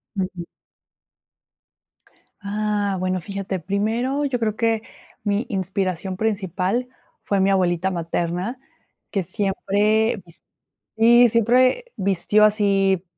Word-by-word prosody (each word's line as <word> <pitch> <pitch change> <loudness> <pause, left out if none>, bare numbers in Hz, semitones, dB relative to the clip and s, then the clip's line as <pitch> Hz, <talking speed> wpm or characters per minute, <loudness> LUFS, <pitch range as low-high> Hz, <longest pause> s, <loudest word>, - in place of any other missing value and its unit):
Ujú. 185 -3 -3 2.0
Ah, 205 -1 -1
bueno, 185 0 -1
fíjate, 195 +1 -4
primero 225 - -1
yo 260 -3 -1
creo 215 -2 -1
que 225 -1 +1 0.4
mi 205 +3 0
inspiración 190 -1 -2
principal, 205 +2 -1 0.3
fue 200 - 0
mi 190 +1 +3
abuelita 185 -1 +1
materna, 175 +6 -3 0.5
que 200 - 0
siempre 205 +4 +1
vist 170 -1 -9 0.5
sí, 240 +2 +7
siempre 245 - +3
vistió 195 +2 +3
así, 195 -3 +2
200 Hz, 100 wpm, -22 LUFS, 190-220 Hz, 2.0 s, sí